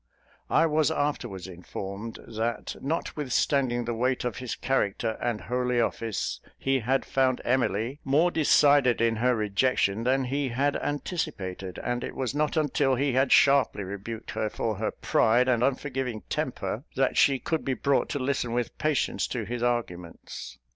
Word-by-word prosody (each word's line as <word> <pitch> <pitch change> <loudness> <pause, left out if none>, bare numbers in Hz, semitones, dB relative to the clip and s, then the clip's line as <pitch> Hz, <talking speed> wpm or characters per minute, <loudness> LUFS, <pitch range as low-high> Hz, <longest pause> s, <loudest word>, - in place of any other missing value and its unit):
I - - +4
was 155 -1 +2
afterwards 125 - -2
informed, 100 +4 -7
that 115 +1 -3
notwithstanding 135 -4 0
the 120 - -2
weight 125 +2 0
of 125 - -2
his 125 -3 -4
character 115 -3 0
and 115 -3 -1
holy 125 0 0
office, 115 -2 -2 0.2
he 135 0 +1
had 130 +3 0
found 130 -1 +1
Emily 120 +1 0
more 155 +6 +3
decided 145 -5 +4
in 115 -1 +2
her 125 +2 +2
rejection 105 0 +1
than 130 +2 +2
he 135 +2 -1
had 140 +4 +1
anticipated; 105 - -3
and 120 0 -2
it - - -5
was 130 -2 -2
not 150 +2 0
until 145 -3 +2
he 135 +1 0
had 130 +1 +2
sharply 135 -7 +4
rebuked 100 +4 -6
her 110 - -1
for 110 -1 -2
her 110 - -1
pride 120 +3 +2
and 120 -3 +2
unforgiving 130 -4 -1
temper, - - -2
that - - +1
she 135 -1 +4
could 160 +4 -2
be 135 - -1
brought 140 +3 +1
to - - -2
listen 130 -3 -1
with 120 0 -2
patience 150 -3 0
to 120 -3 -3
his 120 +3 -4
arguments. 100 -9 -4
125 Hz, 160 wpm, -27 LUFS, 115-140 Hz, 0.2 s, I